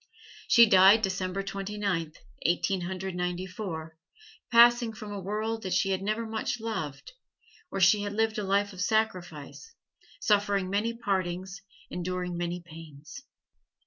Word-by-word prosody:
She 235 0 +8
died 200 +1 +6
December 190 0 -2
Twenty 195 +1 -5
ninth, 170 -6 -2 0.2
Eighteen 180 +2 +1
Hundred 190 +1 -4
Ninety 180 +1 -2
four 165 -5 -7 0.5
passing 235 -1 +6
from 210 0 -8
a 200 - -4
world 215 +4 -3
that 185 -3 -3
she 195 +1 +1
had 190 0 -1
never 215 +3 -1
much 220 +2 -3
loved, 160 -12 -5 0.6
where 195 - -4
she 190 +3 +5
had 205 0 -4
lived 220 0 0
a - - -2
life 200 +1 +1
of 185 - -7
sacrifice, 185 - -2 0.4
suffering 200 -2 +1
many 210 +3 0
partings, 190 -3 -3 0.3
enduring 180 0 -3
many 175 0 -3
pains. 160 - -12
195 Hz, 145 wpm, -28 LUFS, 180-215 Hz, 0.6 s, She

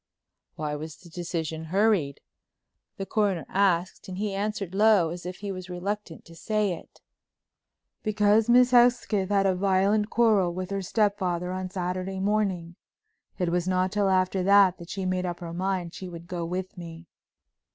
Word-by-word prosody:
"Why 150 -1 -3
was 155 +1 -6
the 175 - -16
decision 160 -2 -4
hurried?" 190 -5 +1 0.8
the 195 - -4
Coroner 200 -5 0
asked 185 -2 +1
and 185 -1 -6
he 205 0 -2
answered 200 -2 -3
low, 200 -5 +4
as 175 0 -7
if 180 - -5
he 200 -1 -4
was 185 -1 -7
reluctant 180 0 -5
to 165 - -14
say 210 +3 0
it. 165 - -12 1.0
"Because 215 +1 +2
Miss 250 +1 +6
Hesketh 240 -5 +3
had 200 -1 +2
a 190 - +3
violent 200 +3 +2
quarrel 210 -7 +3
with 185 +1 -5
her 195 0 -1
stepfather 185 -3 0
on 185 0 -4
Saturday 185 0 -3
morning. 190 -4 -1 0.6
It 180 -3 0
was 175 +1 0
not 185 0 +1
till 205 -1 +1
after 185 0 +2
that 195 -1 +5
that 170 0 -11
she 195 -1 -4
made 185 0 -1
up 175 -1 -4
her 170 -1 -7
mind 180 -1 -2
she 185 - -7
would 170 -1 -9
go 175 -1 -4
with 185 +3 -4
me." 165 -1 -9
185 Hz, 170 wpm, -26 LUFS, 175-205 Hz, 1.0 s, Miss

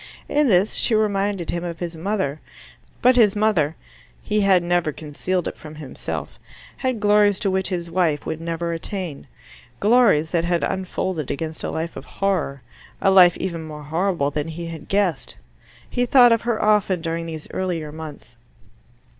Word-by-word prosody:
In 295 0 +2
this 195 -2 +3
she 225 - +1
reminded 200 -4 0
him 170 0 -3
of 170 -1 -5
his 170 -1 -5
mother. 165 -4 -2 0.6
But 250 +1 +5
his 215 -4 +5
mother 195 -8 +2 0.5
he 210 0 +1
had 190 -3 +4
never 175 -2 +1
concealed 160 +4 -3
it - - -4
from 155 0 -11
himself 150 -3 -6 0.4
had 255 -4 -1
glories 205 -1 +4
to 195 - +1
which 190 0 0
his 170 -3 -4
wife 165 -5 +1
would 160 0 -4
never 170 0 -2
attain: 165 -3 -5 0.5
glories 205 - +4
that 170 -2 +1
had 170 0 0
unfolded 185 -4 -2
against 160 +2 -4
a - - -2
life 160 +1 -4
of 135 - -8
horror 180 -9 -2 0.4
a 195 - +3
life 180 -2 +7
even 170 -3 -3
more 155 -1 -8
horrible 160 -1 0
than 150 +1 -2
he 165 +1 -6
had 165 -2 -8
guessed. 195 -7 0 0.5
He 245 0 -1
thought 245 -1 +7
of 230 - +3
her 235 -2 -1
often 210 -4 +2
during 165 0 -3
these 160 -2 -7
earlier 170 -5 -3
months. 150 -6 -10
175 Hz, 170 wpm, -22 LUFS, 160-200 Hz, 0.6 s, life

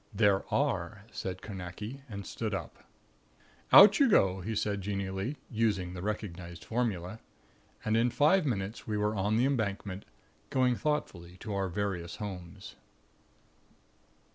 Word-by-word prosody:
"There 100 -3 +2
are," 95 +3 0
said 95 -1 -5
Carnacki; 105 +6 -7
and 100 -2 -6
stood - - -3
up. - - -7 0.9
"Out 200 +1 +10
you 275 -3 +6
go," 95 - +4
he 110 +5 -3
said, 100 -1 -1
genially, 100 +6 -3
using 105 -6 0
the 90 - -6
recognized 90 -4 -5
formula. 110 -4 -2 0.7
And 110 - +2
in 115 +2 +3
five 155 +9 +4
minutes 110 -5 -3
we 105 -1 -1
were 105 +1 +1
on 105 +1 +1
the 120 - +3
Embankment, 100 -7 -2 0.4
going 130 -2 +2
thoughtfully 90 - -3
to 110 -2 -4
our 95 -1 -1
various 90 -2 -3
homes. 90 -5 -8
100 Hz, 135 wpm, -31 LUFS, 95-115 Hz, 0.9 s, Out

